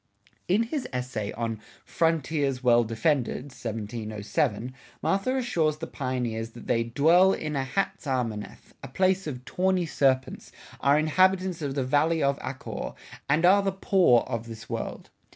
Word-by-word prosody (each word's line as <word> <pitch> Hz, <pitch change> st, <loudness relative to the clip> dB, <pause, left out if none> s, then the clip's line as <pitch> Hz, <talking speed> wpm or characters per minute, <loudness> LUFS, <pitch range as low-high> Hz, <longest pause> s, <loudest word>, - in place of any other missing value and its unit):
In 200 Hz, +6 st, +3 dB
his 250 Hz, +3 st, -3 dB
essay 125 Hz, -5 st, -3 dB
on 115 Hz, -1 st, -3 dB, 0.2 s
"Frontiers 150 Hz, -5 st, 0 dB
Well 120 Hz, -1 st, +5 dB
Defended" 125 Hz, +4 st, -1 dB
(1707) 110 Hz, +2 st, -3 dB, 0.3 s
Mather 200 Hz, +7 st, +1 dB
assures 165 Hz, -, 0 dB
the 165 Hz, -, -5 dB
pioneers 125 Hz, -6 st, -3 dB
that 120 Hz, -, -11 dB
they 115 Hz, -1 st, +1 dB
"dwell 165 Hz, +10 st, +4 dB
in 150 Hz, -1 st, -3 dB
a 135 Hz, -, 0 dB
Hatsarmaneth," 130 Hz, -, -3 dB
a -, -, -7 dB
place 185 Hz, +6 st, +1 dB
of 130 Hz, -4 st, -6 dB
"tawney 185 Hz, +2 st, +1 dB
serpents," 135 Hz, -4 st, 0 dB, 0.3 s
are 140 Hz, +1 st, +4 dB
"inhabitants 185 Hz, +3 st, +2 dB
of 140 Hz, -2 st, -3 dB
the 135 Hz, -, 0 dB
Valley 150 Hz, +4 st, +2 dB
of 140 Hz, 0 st, +1 dB
Achor," 130 Hz, 0 st, -5 dB, 0.4 s
and 155 Hz, +5 st, +3 dB
are 195 Hz, +3 st, +6 dB
"the 195 Hz, 0 st, 0 dB
Poor 190 Hz, -, +4 dB
of 115 Hz, 0 st, -5 dB
this 110 Hz, -1 st, -9 dB
World." -, -, -5 dB
140 Hz, 145 wpm, -27 LUFS, 120-175 Hz, 0.4 s, are